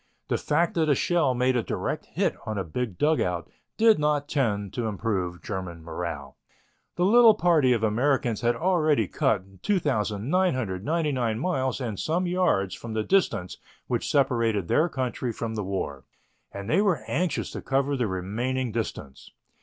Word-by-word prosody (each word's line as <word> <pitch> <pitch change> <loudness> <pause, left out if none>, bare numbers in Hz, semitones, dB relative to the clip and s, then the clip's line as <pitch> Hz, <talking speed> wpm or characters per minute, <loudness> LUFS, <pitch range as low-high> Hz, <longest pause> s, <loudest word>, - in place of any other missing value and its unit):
The - - +1
fact 165 +3 +1
that 160 -2 +1
a 145 - +5
shell 155 -4 +1
made 125 +1 +2
a 120 - +2
direct - - -3
hit - - 0
on 110 -1 -2
a 95 - -1
big 100 +3 -4
dugout 90 - +1 0.3
did 225 -5 +5
not 150 -1 +1
tend 105 - -1
to 120 -2 -2
improve 95 -5 -2
German 90 -5 -5
morale. 80 -5 -6 0.6
The 175 - +1
little 225 +1 +7
party 160 -7 +3
of 115 -2 +1
Americans 120 +1 +1
had 120 0 +2
already 155 - +2
cut 95 -1 -1
2,999 130 - 0
miles 130 -3 -1
and 115 -6 -4
some 175 +4 0
yards 175 - +1
from 115 -1 -7
the 110 -1 0
distance 180 - +1 0.3
which - - -2
separated 115 -8 +1
their 160 - +2
country 130 -3 -2
from 115 0 -4
the 105 -2 -3
war, 75 -8 -4 0.5
and 100 0 -7
they 190 - +3
were 190 -9 +1
anxious 170 0 -1
to - - -6
cover 140 +1 0
the 125 -4 0
remaining 115 +7 -2
distance. 105 - -5
125 Hz, 160 wpm, -26 LUFS, 100-150 Hz, 0.6 s, little